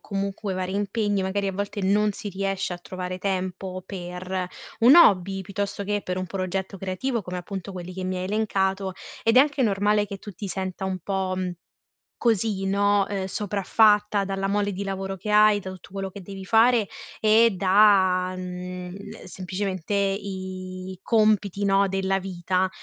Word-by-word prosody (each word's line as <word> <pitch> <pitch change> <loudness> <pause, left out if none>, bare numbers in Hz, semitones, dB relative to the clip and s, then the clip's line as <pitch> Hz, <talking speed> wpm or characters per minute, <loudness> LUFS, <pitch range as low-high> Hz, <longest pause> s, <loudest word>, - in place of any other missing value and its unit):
comunque 200 0 -3
vari 185 +1 -3
impegni, 205 0 0
magari, 195 +1 -1
a 195 - -1
volte, 205 +1 -3
non 205 +2 +3
si 210 0 -6
riesce 195 -1 -2
a 175 - -5
trovare 185 0 -6
tempo 185 -1 -3
per 180 0 -4 0.3
un 250 +7 +8
hobby, 195 - +5
piuttosto 200 +1 -3
che 205 +1 -1
per 180 0 -3
un 185 - -3
progetto 190 +1 -3
creativo 205 +6 -2
come, 180 0 -5
appunto, 190 +1 -6
quelli 180 0 -7
che 185 0 -5
mi 185 0 -2
hai 180 - -3
elencato, 195 -2 0 0.3
ed 225 +2 +3
è 260 - +10
anche 285 -2 +2
normale 205 0 +2
che 200 0 -7
tu 205 - -9
ti 195 +3 -6
senta 190 0 -4
un 190 -1 -2
po', 190 +1 -2
mhmm, 185 -1 -2 0.7
così, 215 -4 +1
no, 200 0 +3
uhm, 195 -2 -2
sopraffatta, 205 +1 +2
dalla 195 0 -2
mole 205 0 0
di 195 +2 -4
lavoro 195 0 -3
che 200 +4 -5
hai, 210 0 +6
da 190 - -6
tutto 185 0 -12
quello 195 -1 -4
che 200 - -9
devi 195 +1 -8
fare, 225 +1 +4 0.3
e 220 +1 +5
da, 185 -1 +4
mhmm, 180 +1 -7
semplicemente 185 0 -4
i 190 -2 -3
compiti, 210 -3 +2
no, 200 0 +4
della 195 0 0
vita. 185 0 -1
195 Hz, 170 wpm, -25 LUFS, 185-205 Hz, 0.7 s, è